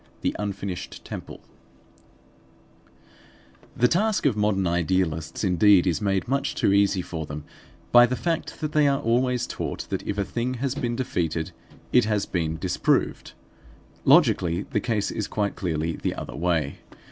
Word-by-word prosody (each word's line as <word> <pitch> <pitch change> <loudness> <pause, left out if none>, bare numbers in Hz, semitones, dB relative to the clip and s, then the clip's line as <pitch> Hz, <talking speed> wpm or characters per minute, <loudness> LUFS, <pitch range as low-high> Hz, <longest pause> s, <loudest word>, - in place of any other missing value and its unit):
THE - - -1
UNFINISHED 100 -3 -5
TEMPLE - - -8 2.4
The 125 - +5
task 210 - +1
of 135 -7 +3
modern 105 -2 +1
idealists 85 -1 0
indeed 95 0 +5
is 85 -4 0
made 100 +1 0
much 140 +2 -1
too 100 - +2
easy 100 -2 +3
for 80 -3 -5
them 75 0 -6 0.5
by 120 0 +8
the 125 - -1
fact 165 +3 -3
that 155 -1 -2
they 150 -1 +4
are 140 -1 +2
always 125 +1 +1
taught - - -4
that - - -1
if 100 - -2
a 100 - 0
thing 120 +5 -2
has 130 +1 -2
been 120 -5 -2
defeated 85 - -2 0.4
it 125 -2 +5
has 105 -2 0
been 80 -3 -2
disproved. 90 +1 0 0.7
Logically, 85 +2 +4
the - - +1
case 110 -4 -1
is 105 - -3
quite 105 -2 -1
clearly 80 -3 -2
the - - -2
other - - -7
way. 80 -5 -1
100 Hz, 155 wpm, -25 LUFS, 85-125 Hz, 2.4 s, by